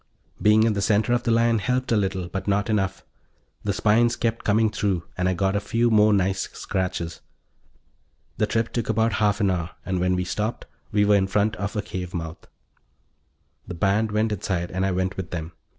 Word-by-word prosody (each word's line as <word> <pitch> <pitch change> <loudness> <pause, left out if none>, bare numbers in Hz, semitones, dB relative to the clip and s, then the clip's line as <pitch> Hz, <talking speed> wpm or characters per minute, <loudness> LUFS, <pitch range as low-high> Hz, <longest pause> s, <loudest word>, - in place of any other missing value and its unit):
Being 105 +1 +5
in 115 -1 +3
the 100 - -2
center 110 +3 +2
of 120 - +2
the 120 - -2
line 115 0 +3
helped 125 +5 -1
a - - +4
little 95 -3 -1
but 95 +3 -5
not 100 +2 +1
enough; 95 -4 -1 0.6
the 105 - 0
spines 115 +4 +3
kept 115 -1 -2
coming 110 +1 +2
through 100 -5 -1
and 90 0 0
I 95 - 0
got 95 +2 0
a - - +2
few 115 +3 +1
more 105 0 +5
nice 95 -1 +1
scratches. 85 -3 -3 1.2
The 110 - +1
trip 115 +1 -1
took 120 -3 -2
about 110 0 +2
half 105 -1 +2
an 100 -2 +3
hour, 85 -2 -3
and 95 0 -1
when 90 +1 +1
we 90 - 0
stopped 105 +5 -3 0.3
we 105 0 +3
were 105 0 +5
in 95 -1 +1
front 105 +3 +1
of 100 +2 -4
a 105 - -1
cave 90 -1 -6
mouth. 80 -1 -6 1.2
The 90 - -6
band 100 +5 +1
went 110 +1 +1
inside 90 -3 -2
and 95 +1 0
I - - 0
went 95 +1 -1
with 95 -2 -4
them. 80 -1 -5
100 Hz, 205 wpm, -24 LUFS, 95-110 Hz, 1.2 s, Being